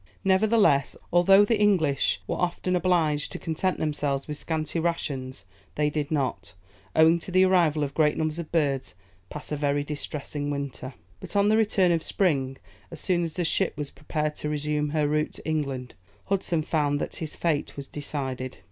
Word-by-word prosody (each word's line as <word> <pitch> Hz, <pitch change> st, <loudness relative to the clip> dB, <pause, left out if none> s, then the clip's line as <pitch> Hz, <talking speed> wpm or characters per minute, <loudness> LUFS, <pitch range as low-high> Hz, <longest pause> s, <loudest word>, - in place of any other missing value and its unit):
Nevertheless, 195 Hz, -, +3 dB, 0.2 s
although 195 Hz, +3 st, +6 dB
the 220 Hz, 0 st, +1 dB
English 160 Hz, -10 st, +2 dB
were -, -, -2 dB
often 180 Hz, +1 st, -1 dB
obliged 165 Hz, -5 st, +1 dB
to -, -, -4 dB
content 170 Hz, +3 st, -1 dB
themselves 145 Hz, -3 st, -1 dB
with 150 Hz, -, -4 dB
scanty 160 Hz, +2 st, -2 dB
rations, 135 Hz, -, -3 dB, 0.3 s
they 150 Hz, 0 st, +1 dB
did 150 Hz, -1 st, -2 dB
not, 135 Hz, -, -2 dB, 0.4 s
owing 160 Hz, +2 st, +6 dB
to 170 Hz, -, -8 dB
the 185 Hz, +1 st, +5 dB
arrival 170 Hz, -5 st, +3 dB
of 140 Hz, -, -3 dB
great 150 Hz, -2 st, +2 dB
numbers 155 Hz, +1 st, -1 dB
of 170 Hz, -, -6 dB
birds, 140 Hz, -, 0 dB, 0.3 s
pass 150 Hz, -, -8 dB
a -, -, 0 dB
very 145 Hz, 0 st, 0 dB
distressing 145 Hz, 0 st, -5 dB
winter. 140 Hz, -3 st, -5 dB, 0.2 s
But, -, -, -9 dB
on 200 Hz, +1 st, +4 dB
the 215 Hz, -, +4 dB
return 205 Hz, -5 st, +3 dB
of 165 Hz, -1 st, +2 dB
spring, 135 Hz, -10 st, 0 dB, 0.3 s
as -, -, -8 dB
soon 175 Hz, -2 st, +1 dB
as 165 Hz, -2 st, -3 dB
the 175 Hz, 0 st, -1 dB
ship 180 Hz, 0 st, 0 dB
was 145 Hz, -2 st, -4 dB
prepared 150 Hz, +1 st, -3 dB
to 150 Hz, -, -3 dB
resume 150 Hz, 0 st, -1 dB
her 150 Hz, -1 st, +1 dB
route 150 Hz, +1 st, 0 dB
to -, -, -10 dB
England, 135 Hz, -5 st, -2 dB, 0.3 s
Hudson 185 Hz, -5 st, 0 dB
found 145 Hz, -2 st, 0 dB
that -, -, -4 dB
his 155 Hz, -2 st, -5 dB
fate 155 Hz, -5 st, -1 dB
was 140 Hz, -1 st, -6 dB
decided. 130 Hz, -3 st, -4 dB
150 Hz, 180 wpm, -26 LUFS, 145-175 Hz, 0.4 s, although